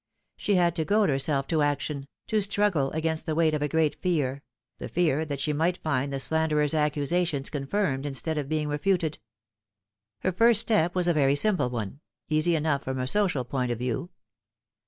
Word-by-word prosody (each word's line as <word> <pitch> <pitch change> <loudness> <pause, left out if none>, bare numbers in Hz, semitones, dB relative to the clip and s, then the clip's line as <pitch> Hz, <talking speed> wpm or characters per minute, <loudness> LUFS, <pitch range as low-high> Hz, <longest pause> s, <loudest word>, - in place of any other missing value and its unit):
She 205 - 0
had 175 -2 +2
to 160 - +1
goad 205 +4 +2
herself 135 0 0
to 160 -2 +1
action, 145 -1 -1 0.2
to 215 -1 +1
struggle 200 -8 +2
against 160 +1 -2
the 155 - -1
weight 160 -1 +3
of 150 - -1
a 150 - +1
great 160 0 0
fear 140 -7 0 0.4
the - - -5
fear 160 -3 +1
that 145 -2 -4
ehe 150 +2 -1
might 170 +4 +1
find 140 -4 -1
the 135 - -2
slanderer's 150 0 +1
accusations 150 0 0
confirmed 145 -1 -1
instead 150 +3 -2
of 140 -1 -5
being 155 -1 -1
refuted. 160 +1 0 1.0
Her 185 - +1
first 225 +4 +4
step 195 -7 +1
was 180 -1 +1
a 175 - +4
very 140 -2 +3
simple 185 -4 +2
one, 115 +1 -5 0.3
easy 155 +2 +2
enough 150 -3 0
from 130 0 -3
a 130 - -1
social 175 -4 +1
point 125 0 -2
of 120 - -2
view. 125 +7 -3
155 Hz, 185 wpm, -27 LUFS, 140-175 Hz, 1.0 s, first